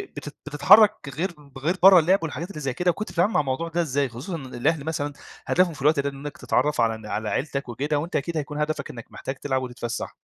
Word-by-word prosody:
بتت 145 0 -8
بتتحرك 205 +9 +6 0.2
غير 185 +4 -1 0.3
غير 160 +7 0
برا 190 -1 +10
اللعب 180 +5 +3
والحاجات 165 +3 -4
اللي 175 - -7
زي 135 -3 -2
كده، 180 +6 +2
وكنت 210 +5 -6
بتتعامل 185 +5 +1
مع 180 - +3
الموضوع 140 +3 -1
ده 170 +1 0
إزاي؟ 140 -3 0
خصوصًا 125 +10 -6
إن 140 -5 -7
الأهل 140 +5 0
مثلًا 150 -3 -2 0.3
هدفهم 180 -2 +3
في 140 - -11
الوقت 150 +1 +3
ده 140 0 0
إنك 140 +1 -8
تتعرف 145 -1 +1
على 115 -1 +2
الن 110 - -11
على 105 0 -3
عيلتك 140 -2 -2
وكده 145 +5 -1
وأنت 165 +4 -5
أكيد 165 +3 -1
هيكون 150 0 -4
هدفك 150 -2 -2
إنك 115 -2 -9
محتاج 135 - -5
تلعب 130 -1 -2
وتتفسح؟ 120 -2 -5
150 Hz, 225 wpm, -24 LUFS, 135-170 Hz, 0.3 s, برا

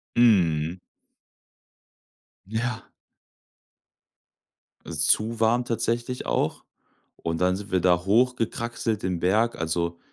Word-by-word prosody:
Mhm. 90 -8 +3 1.7
Ja. 110 +2 -4 2.0
Ist - - +2
zu 110 +1 +2
warm 120 +2 +2
tatsächlich 120 +1 -2
auch. - - -1 0.5
Und 80 +1 -3
dann 90 0 +3
sind 100 +1 -8
wir 95 - +2
da 90 0 +2
hochgekraxelt, 115 -1 0
den 90 -2 -1
Berg. 110 +7 +2
Also, 85 +1 -2
105 Hz, 95 wpm, -25 LUFS, 90-115 Hz, 2.0 s, Mhm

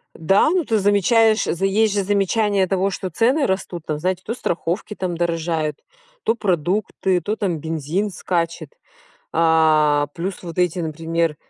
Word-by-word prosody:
Да, 195 - +3
ну 360 -2 +1
ты 220 -3 +1
замечаешь, 215 +3 +3
есть 195 +4 +1
же 200 -1 0
замечание 200 0 +1
того, 195 +1 +1
что 190 -1 -4
цены 250 - +2
растут 185 -4 -3
там, 155 - -2
знаете, 185 +3 -2
то 225 - -2
страховки 175 -2 -3
там 185 -4 -3
дорожают, 165 -3 -1 0.4
то 225 - +2
продукты, 185 -1 0
то 210 +4 -2
там 180 -6 -1
бензин 160 +6 -2
скачет. 165 -3 -3 0.6
А 155 -3 +3
плюс 185 +3 -5
вот 170 -2 -8
эти, 180 0 +1
например, 165 0 -1
180 Hz, 145 wpm, -21 LUFS, 165-205 Hz, 0.6 s, Да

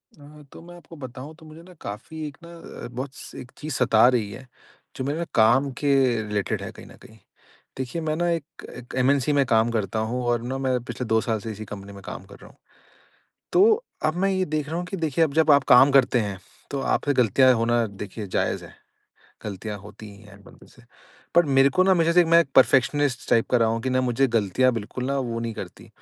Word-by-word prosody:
अ, 150 0 -15
तो - - -12
मैं 175 +1 -13
आपको 170 -1 -14
बताऊँ 130 +1 -9
तो 160 0 -17
मुझे 155 +1 -13
ना 180 +1 -15
काफ़ी 130 +10 -7
एक 145 0 -11
ना 170 0 -10
बहुत 130 +2 -5
स - - -11
एक 125 - -10
चीज़ 155 -1 -6
सता 120 -3 +4
रही 105 -4 -2
है 130 +6 -11 0.5
जो - - -4
मेरे 150 +5 -2
काम 120 +5 +4
के 145 -1 +2 0.3
रिलेटेड 105 -2 -2
है - - -6
कहीं - - -13
न - - -15
कहीं। 110 - -16 0.6
देखिए 130 +6 -4
मैं 155 -1 -1
ना 175 +2 0
एक 165 -3 -5
एक 125 0 -11
एमएनसी 135 +2 +2
में 140 -1 +3
काम 115 -1 +2
करता 110 -2 -2
हूँ 125 0 -2
और 120 -1 +1
ना 130 +2 -4
मैं 130 -2 0
पिछले 125 0 -6
2 110 0 +3
साल 110 -2 -2
से 110 +2 -6
इसी 110 +1 -8
कंपनी 100 0 -9
में 100 - -11
काम - - -8
कर 100 +1 -14
रहा - - -14
हूँ। - - -21 1.0
तो 430 +5 +4 0.2
अब 155 - 0
मैं 195 - +2
ये 190 -1 0
देख 150 -2 -3
रहा 165 - -3
हूँ 175 - -3
कि 195 - -5
देखिए 165 -2 +1
अब 150 - -3
जब 160 -1 +3
आप 140 -1 +4
काम 135 +3 +7
करते 130 -2 +4
हैं 100 -3 -4 0.3
तो 140 - -3
आपसे 145 - 0
गलतियाँ 130 +2 +4
होना 115 0 +1 0.2
देखिए 105 +1 -7
जायज़ 95 - -2
है। - - -14 0.7
गलतियाँ 105 +1 -5
होती 105 +2 -12
ही 100 - -17
हैं 100 -1 -16
बंदे - - -17
से - - -20 0.5
पर 175 0 +6
मेरे 135 +1 +6
को 185 +7 +2
ना 190 - +3
हमेशा 170 -2 +3
से 175 +1 +5
मैं 165 +1 +5
एक 155 - -5
परफ़ेक्शनिस्ट 130 0 +3
टाइप 115 - +3
का 125 - +4
रहा 115 -1 +3
हूँ 115 0 -2
कि 130 - -2
ना 130 0 +1
मुझे 125 +2 +1
गलतियाँ 115 +2 +2
बिल्कुल 115 +3 -5
ना 140 +1 -1
वो 120 -3 -3
नहीं 115 -1 -4
करतीं - - -9
130 Hz, 235 wpm, -24 LUFS, 115-155 Hz, 1.0 s, काम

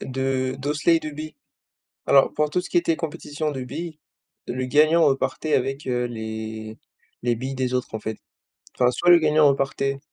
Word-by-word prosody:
de 130 0 -1
d'osselets 150 +4 +2
et - - -1
de 155 - -5
billes. 155 +1 -8 0.7
Alors 135 -1 +5
pour 150 0 +1
tout 180 - +1
ce 180 - -9
qui - - -1
était 165 -2 +1
compétition 155 -1 -4
de 135 -3 -5
billes, 155 +5 -6 0.5
le 130 +1 -3
gagnant 155 +5 +4
repartait 140 +3 0
avec, 135 +2 -1
heu, 125 -1 0
les 110 -1 -6 0.4
les 120 0 +1
billes 130 +3 -4
des 130 -1 -1
autres 125 -2 -2
en 110 - -3
fait. 110 0 -5 0.6
Enfin 125 0 +3
soit 175 +7 +1
le 175 - +9
gagnant 155 -1 +4
repartait 135 0 0
135 Hz, 185 wpm, -23 LUFS, 125-155 Hz, 0.7 s, le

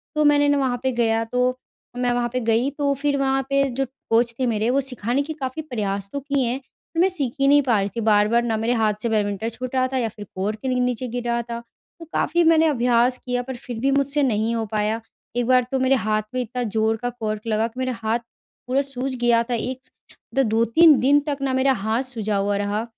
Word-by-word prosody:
तो 305 - +2
मैंने 290 0 +4
न 285 - +4
वहाँ 260 -3 0
पे 260 - +1
गया 225 -2 +1
तो 250 +2 0 0.4
मैं 245 -1 +1
वहाँ 240 0 0
पे 255 - 0
गई 235 +4 +2
तो 280 -1 +1
फिर 285 +1 0
वहाँ 270 0 +1
पे 275 0 +3
जो 270 +2 -1 0.2
कोच 235 +1 +2
थे 255 - +1
मेरे 220 -1 0
वो 275 +2 +2
सिखाने 250 0 -1
के 315 +2 -5
काफ़ी 270 +1 -4
प्रयास 200 -8 -3
तो 280 - -2
किए 280 -2 -1
हैं 250 +3 -2 0.4
पर - - 0
मैं 375 - +5
सीख 280 -10 -2
ही 275 - +3
नहीं 290 +1 +6
पा 235 -6 +2
रही 195 +1 -1
थी 230 - -2
बार-बार 215 +3 +4
न 225 -2 -1
मेरे 235 +2 +1
हाथ 220 -2 +2
से 235 - -1
बैडमिंटन 210 0 0
छूट 255 +3 -6
रहा 255 0 +3
था - - +1
या 230 -3 0
फिर 210 0 -10
कॉर्क 210 +3 -2
के 265 - -4
नीचे 250 0 -1
गिर 240 +1 -4
रहा 235 0 +1
था 235 0 -6 0.4
तो 330 - -9
काफ़ी 345 0 +2
मैंने 325 0 +5
अभ्यास 245 -2 +2
किया 250 -1 -1
पर 260 0 -6
फिर 240 -2 -7
भी 275 +3 +1
मुझसे 280 +1 +2
नहीं 225 -2 +1
हो 225 -1 -1
पाया। 215 +1 0 0.4
एक 245 -1 0
बार 255 -1 +4
तो 265 - 0
मेरे 260 +1 +3
हाथ 215 -3 0
में 255 - 0
इतना 245 +1 -3
ज़ोर 220 0 0
का 245 - 0
कॉर्क 215 -3 -4
लगा 220 +1 +1
कि 245 +3 -11
मेरे 255 0 -1
हाथ 220 +2 0 0.5
पूरा 265 +2 +2
सूज 270 -1 -3
गया 235 -1 +4
था - - 0
एक 255 +3 -3
स - - -19 0.6
2-3 235 +8 +5
दिन 285 +3 +4
तक 285 -2 -1
ना 270 -1 0
मेरा 260 +1 +3
हाथ 220 +3 +1
सूजा 220 -5 -2
हुआ 200 0 0
रहा 205 +2 -1
245 Hz, 245 wpm, -22 LUFS, 225-270 Hz, 0.6 s, नहीं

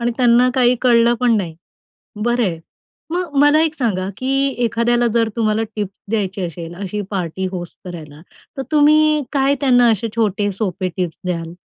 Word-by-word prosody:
आणि 235 0 0
त्यांना 245 0 +4
काही 250 -1 +4
कळलं 235 -1 +4
पण 240 -3 +3
नाही. 175 -5 -3 0.7
बरं 240 0 +1
आहे. 170 -6 -2 0.5
मग 345 -3 -3
मला 290 +2 +5
एक 320 -1 0
सांगा 195 -8 -1
की 260 - -3 0.3
एखाद्याला 240 +1 +1
जर 230 -1 +2
तुम्हाला 220 -1 +1
टिप 210 -2 -2 0.2
द्यायची 200 -3 -2
असेल, 170 0 -8
अशी 200 +2 -4
पार्टी 190 -1 -3
होस्ट 175 -2 -7
करायला, 155 -4 -9 0.4
तर 270 - -2
तुम्ही 305 0 +4
काय 275 0 +2
त्यांना 245 -3 +4
असे 220 +1 -1
छोटे 205 -2 0
सोपे 190 -2 -3
टिप्स 180 -4 -3
द्याल? 170 -2 -3
230 Hz, 165 wpm, -18 LUFS, 185-250 Hz, 0.7 s, मला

